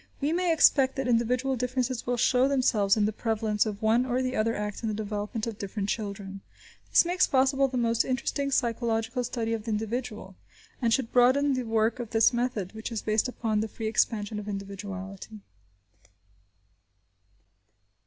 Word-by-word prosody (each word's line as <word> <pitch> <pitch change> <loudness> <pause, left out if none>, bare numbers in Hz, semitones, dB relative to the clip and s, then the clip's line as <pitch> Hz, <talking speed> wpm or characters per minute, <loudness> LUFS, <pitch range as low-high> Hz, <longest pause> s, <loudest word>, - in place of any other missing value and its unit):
We 295 +3 0
may 355 0 +1
expect 275 -4 +4
that 270 -2 -2
individual 250 +3 +1
differences 250 0 -2
will 245 0 0
show 250 +2 +3
themselves 225 -7 +2
in 210 - +3
the 215 - -1
prevalence 220 -1 0
of 210 +1 -6
one 225 +3 +3
or 255 0 -1
the 255 0 -2
other 225 +1 +1
act 210 0 -4
in 225 - -2
the 215 - -2
development 210 +1 -3
of 225 -3 -6
different 200 0 -4
children. 200 -2 -4 0.5
This - - +5
makes 360 +1 +2
possible 270 0 +3
the 255 -1 -4
most 230 -1 +2
interesting 270 +2 -2
psychological 235 -1 0
study 230 -1 -2
of 220 -1 -4
the - - -4
individual, 220 -2 -4 0.5
and 235 -2 +2
should 235 0 +1
broaden 260 +3 +4
the 255 -1 -2
work 225 +1 +1
of 235 -3 -5
this 225 +2 +4
method, 235 -6 -2
which 220 +2 -6
is 225 - -4
based 215 +3 +1
upon 225 -4 -1
the 220 - -1
free 220 +1 -7
expansion 215 -1 0
of 210 - -8
individuality. 195 +1 -7
230 Hz, 175 wpm, -27 LUFS, 210-255 Hz, 0.5 s, This